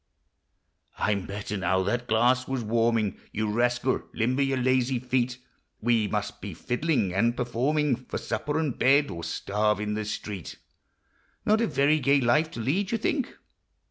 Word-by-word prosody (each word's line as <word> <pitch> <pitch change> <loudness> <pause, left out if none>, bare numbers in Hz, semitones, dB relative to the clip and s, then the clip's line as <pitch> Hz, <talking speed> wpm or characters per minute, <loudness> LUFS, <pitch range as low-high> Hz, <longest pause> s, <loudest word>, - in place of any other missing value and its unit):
I'm 100 -3 0
better 105 +1 -4
now; 95 0 +1
that 120 +5 -1
glass 125 +3 +3
was 135 -3 -2
wanning. 115 -2 +1
You 105 0 -1
rascal! 120 +3 +1
limber 125 +4 +1
your 135 -1 +1
Lazy 130 0 +2
tret! 125 0 0 0.4
We 115 -2 +2
must - - -3
be - - -6
fiddling 125 - 0
and 115 +5 +1
performing 130 +4 +1
For - - -4
supper 145 +7 -2
and 155 -6 -1
bed, 140 +3 +4
or 85 0 -6
starve 105 +3 0
in 105 0 -2
the 110 0 -2
street. 105 -4 -6 0.9
Not 215 +2 +3
a 230 - +2
very 145 +1 +3
gay 140 0 +3
life 150 +6 +2
to - - -8
lead, 185 - 0
you 230 - +1
think 260 +4 -2
120 Hz, 160 wpm, -27 LUFS, 110-135 Hz, 0.9 s, bed